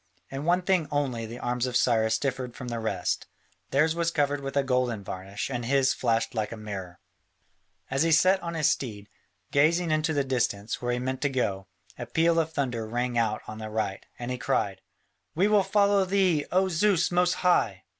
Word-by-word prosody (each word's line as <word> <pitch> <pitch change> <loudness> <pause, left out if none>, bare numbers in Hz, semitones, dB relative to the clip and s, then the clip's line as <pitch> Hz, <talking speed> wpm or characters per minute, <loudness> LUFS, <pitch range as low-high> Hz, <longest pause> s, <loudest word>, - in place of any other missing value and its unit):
In 135 +2 -5
one 175 +2 +2
thing 180 -4 +2
only 130 -6 -1
the 115 +2 -8
arms 125 0 -1
of 125 - +1
Cyrus 110 -2 +2
differed 130 -1 -3
from 125 -2 -7
the 115 -1 -3
rest: 100 -5 -2 0.4
theirs 155 +4 +3
was 170 0 0
covered 145 -3 0
with 135 0 -4
a 140 - +3
golden 125 -5 0
varnish 95 +6 -5
and 120 -2 -3
his 135 +2 +2
flashed 115 -2 0
like 110 -2 -2
a 115 - -6
mirror. 95 -4 -7 0.9
As 135 0 +1
he 165 +1 +3
sat 185 +4 +4
on 170 -1 -5
his 155 -3 +2
steed, 105 -5 -4 0.4
gazing 160 +4 +3
into 155 +1 +1
the 145 -2 +1
distance, 115 -5 -1
where 120 0 -1
he 120 - 0
meant 130 +1 -3
to 145 - +1
go, 100 -8 -2 0.3
a 120 - -5
peal 165 +6 +2
of 160 0 -1
thunder 120 -7 -2
rang 120 +2 -2
out 110 -2 0
on 110 0 -7
the 110 0 -6
right, 105 -3 -2
and 120 +1 -5
he 125 - -3
cried, - - -1 0.5
"We 185 +5 +3
will 210 -1 +4
follow 200 0 +3
thee, 185 -5 +1
O 190 +1 +3
Zeus 185 +1 +2
most 180 0 +3
high!" 110 - +2
130 Hz, 200 wpm, -27 LUFS, 115-165 Hz, 0.9 s, sat